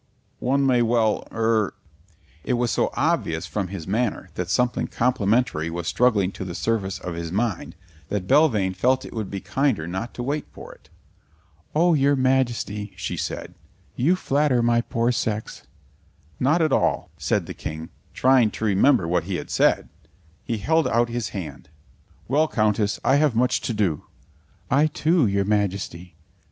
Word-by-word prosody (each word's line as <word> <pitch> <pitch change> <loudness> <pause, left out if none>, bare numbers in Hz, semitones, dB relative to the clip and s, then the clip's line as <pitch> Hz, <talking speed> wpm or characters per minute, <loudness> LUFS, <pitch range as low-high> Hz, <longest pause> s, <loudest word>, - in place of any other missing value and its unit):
One 135 +2 +1
may 125 -2 +3
well 115 -2 +1
er 110 -2 +1 0.3
" 80 -2 -32
It - - -1
was 120 -1 0
so - - +1
obvious 80 +1 0
from 95 +2 -3
his 90 -4 -7
manner 105 -3 -2
that 90 +1 -4
something 125 +7 +1
complimentary 115 -8 +1
was 85 +1 -5
struggling 105 -6 +2
to 95 - -7
the 90 -2 -6
surface 100 -4 -1
of 90 - -6
his 85 -1 -5
mind, 100 -2 -2 0.3
that 100 -3 -2
Belvane 105 -8 +3
felt 130 +8 +1
it - - -9
would 110 -4 -4
be 100 -1 -5
kinder 105 - 0
not 95 +7 -5
to 120 - -4
wait 145 +3 -2
for - - -11
it. - - -23 0.9
"Oh, 170 +2 +4
your 140 -1 +3
Majesty," 125 -6 0
she - - -4
said, - - -5 0.4
"you 160 +9 +3
flatter 140 -7 +1
my 120 0 +3
poor 115 +1 0
sex." 110 -3 -3 0.7
"Not 155 +6 +3
at 155 -4 +1
all," - - +1
said - - 0
the - - -7
King, 80 +1 -6 0.2
trying 130 -3 +4
to 110 - -5
remember 100 0 +3
what 85 -1 0
he 95 0 -3
had - - -6
said. - - +2 0.6
He 115 - -2
held 160 +9 +2
out 120 +1 +2
his 120 -3 -3
hand. 90 -6 -7 0.6
"Well, 150 +5 +2
Countess, 105 -4 0
I 135 +3 +4
have 145 -5 +2
much 125 +2 +2
to - - -2
do." 90 -8 0 0.7
"I, 145 +4 +4
too, 155 -2 +2
your 100 0 +1
Majesty." 100 -4 -2
115 Hz, 165 wpm, -23 LUFS, 95-130 Hz, 0.9 s, Oh